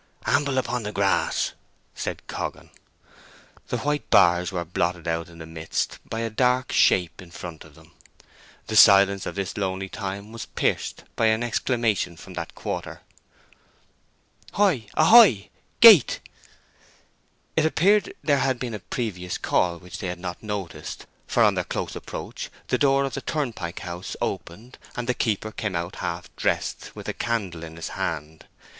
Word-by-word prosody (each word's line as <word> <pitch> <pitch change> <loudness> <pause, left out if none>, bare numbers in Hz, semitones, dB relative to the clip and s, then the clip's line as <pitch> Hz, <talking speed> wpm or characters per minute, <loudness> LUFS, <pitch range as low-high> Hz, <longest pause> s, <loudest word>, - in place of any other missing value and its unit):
"Amble 140 -1 +2
on - - -1
upon 125 -1 0
the 105 -1 -4
grass," 100 -2 +1 0.4
said - - -5
Coggan. - - -5 1.0
The - - -2
white 145 +1 -2
bars 90 +1 +5
were 90 -2 -3
blotted 85 0 -2
out 85 0 -2
in 85 - -14
the 80 - -8
midst 80 0 -3
by 115 - -3
a 115 - -1
dark 125 +3 +1
shape 90 0 +3
in 90 - -13
front 85 -2 -8
of - - -17
them. - - -18 0.7
The 110 - -4
silence 100 -2 +7
of - - -5
this 100 0 -3
lonely 95 -1 -2
time 100 +2 -5
was 115 0 -7
pierced - - -1
by 115 - +3
an 110 +2 +2
exclamation 115 -7 0
from 95 +2 -11
that 85 -2 -6
quarter. - - -5 1.5
"Hoy 180 - +2
a 155 - +4
hoy! 165 - +7 0.3
Gate!" 215 - +9 1.4
It 160 -1 +3
appeared 200 +5 +3
that - - -10
there 145 -3 +3
had 135 -2 +1
been 120 -1 -4
a 105 - -4
previous 90 -5 -4
call 85 -1 +1
which 90 0 -10
they 95 - -3
had 90 0 -4
not 90 -1 -6
noticed, 95 -8 -6 0.2
for - - +3
on - - +5
their - - -1
close - - -4
approach - - -6 0.2
the - - +1
door 140 -1 +4
of 135 - -3
the 140 - -3
turnpike 115 - -3
house 90 0 -6
opened, 110 +9 -5 0.2
and 120 -1 -4
the 125 - +2
keeper 110 -3 -1
came 105 -4 -3
out 85 +2 -3
half 85 0 -5
dressed, - - -2
with - - -9
a - - -2
candle 100 -8 -2
in 80 0 -9
his 80 0 -5
hand. 80 0 -4
100 Hz, 170 wpm, -25 LUFS, 90-125 Hz, 1.5 s, Gate